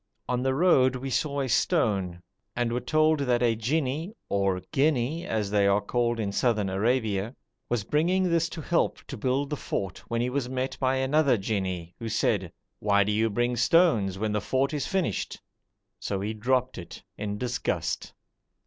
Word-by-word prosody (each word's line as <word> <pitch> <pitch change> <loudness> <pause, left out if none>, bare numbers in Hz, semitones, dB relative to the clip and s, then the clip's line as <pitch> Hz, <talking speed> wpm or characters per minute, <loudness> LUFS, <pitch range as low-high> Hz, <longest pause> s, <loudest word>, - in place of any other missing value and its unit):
On 125 0 0
the 130 0 +1
road 135 -6 +4
we 130 +1 -4
saw 140 0 0
a 135 - -1
stone, 100 - +1 0.3
and 120 -1 0
were 125 - 0
told 155 +4 +2
that 125 -3 +1
a 115 -2 +3
jinni 145 - -1
(or 100 -2 +1
ghinni 145 +2 +1
as 105 -3 -1
they 100 -1 +3
are 100 +1 +4
called 120 +2 -1
in 100 -3 -1
Southern 105 -3 +1
Arabia) 110 +1 0 0.3
was 120 -4 0
bringing 175 - +1
this 170 -2 +1
to 160 - -6
help 170 +3 +1
to 140 - -7
build 130 +5 -1
the - - 0
fort 95 -7 -4
when 115 - -1
he 120 +1 0
was 130 -2 -2
met 130 0 -2
by 130 0 +2
another 135 0 +3
jinni 95 -4 -3
who 115 - -4
said, 100 -4 0 0.3
'Why 100 -1 +3
do 105 - -1
you 110 +2 +2
bring 120 +3 0
stones 120 - +3
when 110 +1 -1
the 105 0 0
fort 135 +7 0
is 145 -3 -2
finished?' 185 - -2 0.6
so 100 - -3
he 105 +2 -2
dropped 125 +2 0
it 85 - -10
in 105 0 -4
disgust. 125 +1 -2
120 Hz, 180 wpm, -27 LUFS, 105-140 Hz, 0.6 s, road